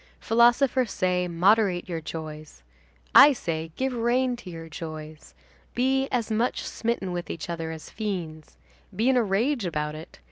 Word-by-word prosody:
Philosophers 240 +1 +3
say: 180 -1 0
'Moderate 185 +1 +2
your 165 -3 -4
joys.' 155 - -8 0.5
I 290 - +9
say: 165 -8 -4
'Give 265 0 -1
rein 245 +2 +1
to 210 - -10
your 165 -1 -8
joys.' 155 -1 -9 0.4
Be 265 +2 +1
as 235 -3 -1
much 230 +3 0
smitten 225 -5 -2
with 175 -1 -4
each 165 +1 -5
other 165 -1 -4
as 160 -1 -8
fiends. 175 -8 -5 0.4
Be 225 +6 +2
in 265 - +3
a 250 - +4
rage 225 +6 0
about 150 -4 -2
it. 155 +1 -10
185 Hz, 155 wpm, -26 LUFS, 160-240 Hz, 0.5 s, I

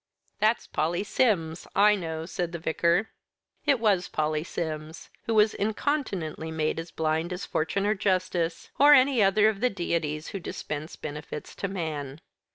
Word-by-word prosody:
"That's 215 +2 +2
Polly 175 +5 -1
Sims, 180 -8 0
I 210 +1 +6
know," 160 -5 -3
said 175 0 -3
the - - -2
Vicar. 170 +5 +1 0.6
It 280 -4 +4
was 200 -5 +2
Polly 155 0 -1
Sims, 160 -2 -5 0.2
who 225 - +1
was 215 0 +5
incontinently 205 - -2
made 160 0 -1
as 165 +1 -6
blind 160 +2 -1
as 180 +1 -4
Fortune 195 +5 -1
or 210 - +3
Justice, 185 -4 -1
or 290 +1 +9
any 260 -3 +4
other 205 +2 +5
of 215 -2 0
the 250 - +3
deities 165 -6 -2
who 195 - -5
dispense 155 -3 -5
benefits 150 0 -7
to 200 - -3
man. 155 -7 -4
175 Hz, 160 wpm, -27 LUFS, 160-210 Hz, 0.6 s, or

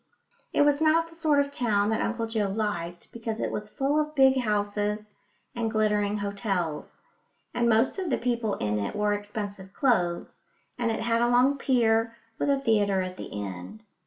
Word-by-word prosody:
It - - +4
was 290 +1 +3
not 325 +1 +3
the 330 - -16
sort 310 -3 +2
of 280 0 +1
town 215 -5 +1
that 220 - 0
Uncle 230 0 -1
Joe 220 -2 -1
liked, 180 -5 -3
because 225 -1 -4
it - - -1
was 210 0 -4
full 280 +5 0
of 305 0 -2
big 265 -1 +5
houses 210 -1 -1 0.4
and 230 -2 -1
glittering 210 -1 +1
hotels; 195 -6 -3 0.5
and 235 -1 +2
most 230 - +2
of 370 -3 -2
the - - +1
people 235 -3 -1
in 105 0 -1
it 100 - -3
wore 210 0 +1
expensive 205 -2 -5
clothes, 185 -11 0 0.3
and 240 -2 -1
it 225 -1 -1
had 230 0 +1
a 240 - +3
long 250 +3 +4
pier, 230 -3 +2 0.2
with - - 0
a 275 -1 +3
theatre 205 -6 +2
at 185 0 -6
the - - -7
end. 95 - -8
220 Hz, 185 wpm, -27 LUFS, 205-250 Hz, 0.5 s, big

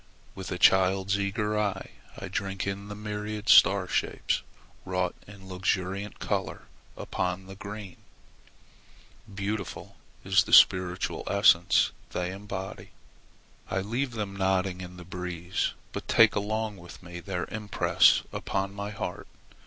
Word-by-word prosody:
With 95 -1 -7
a 90 - -2
child's 95 +2 +4
eager 105 +1 -1
eye 105 -2 -2 0.3
I 95 - -6
drink 95 0 -3
in 100 +1 -4
the 105 - -7
myriad 105 0 -5
star 95 -1 +7
shapes - - -1 0.4
wrought 90 -1 -1
in 100 -2 -13
luxuriant 95 +2 -2
color - - -3 0.3
upon 90 +1 -3
the 95 - -10
green. 100 -1 -8 1.3
Beautiful 100 +2 -5 0.3
is - - +4
the - - -5
spiritual 90 0 +5
essence 90 -4 +4 0.2
they 90 0 -2
embody. 95 -1 -7 0.8
I 95 - 0
leave 120 +6 -2
them 105 -3 -4
nodding 95 -1 0
in 90 0 -9
the 90 - -10
breeze, 90 0 -3 0.2
but - - -6
take 115 -1 +6
along 105 +1 -2
with 85 0 -12
me 85 0 -8
their 90 -1 -3
impress 105 -2 +3
upon 95 0 -2
my 100 0 -5
heart. 105 - -5
95 Hz, 130 wpm, -28 LUFS, 90-105 Hz, 1.3 s, star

